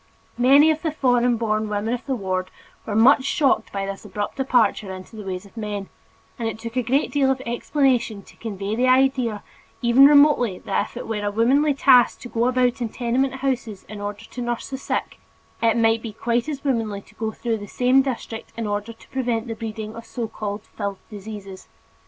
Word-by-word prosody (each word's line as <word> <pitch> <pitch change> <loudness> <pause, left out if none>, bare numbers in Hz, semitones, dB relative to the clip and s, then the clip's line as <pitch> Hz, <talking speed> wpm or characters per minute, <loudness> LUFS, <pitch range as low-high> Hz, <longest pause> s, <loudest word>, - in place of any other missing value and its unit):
Many 280 +5 +6
of 310 0 -2
the 320 - -1
foreign 245 -4 +2
born 215 -1 -1
women 210 +3 -1
of 245 +3 -5
the 265 - 0
ward 185 -4 -2 0.4
were 210 - -2
much 260 +5 +6
shocked 280 0 +1
by 195 -1 -2
this 195 0 -6
abrupt 205 +2 -4
departure 230 -7 +2
into 185 +4 -9
the 215 - -7
ways 190 -1 -5
of 200 - -18
men, 210 -3 -4 0.5
and 230 - -1
it 215 - -6
took 230 +1 -7
a 255 - +2
great 260 +5 +1
deal 280 -2 +2
of 265 0 +1
explanation 240 -3 0
to - - -18
convey 205 -1 -4
the 250 +2 +2
idea 255 -4 +2 0.4
even 250 +3 +7
remotely 285 -9 +5
that - - -1
if - - -12
it - - -6
were 215 -2 -3
a 205 - 0
womanly 270 +8 +3
task 255 -3 +5
to 245 - -8
go 235 +1 +1
about 250 -1 +1
in 235 - -1
tenement 250 +3 0
houses 235 -7 -2
in 210 -1 -8
order 205 0 -5
to 250 - -8
nurse 240 +1 -3
the 265 - -3
sick, - - -3 0.4
it 230 0 +3
might 225 0 +3
be 225 -2 -6
quite 235 +5 -1
as 285 -2 -5
womanly 225 -7 -1
to - - -21
go 220 -1 -3
through 225 -1 -2
the 205 - -8
same 250 +5 +3
district 240 -4 -5
in 230 - -2
order 205 +2 -3
to 225 - -19
prevent 245 -3 -1
the 230 - -3
breeding 220 -1 -6
of 230 - -8
so 235 -2 -4
called 210 -1 -5
"filth 200 -2 -5
diseases." 200 -2 -9
230 Hz, 210 wpm, -23 LUFS, 210-255 Hz, 0.5 s, even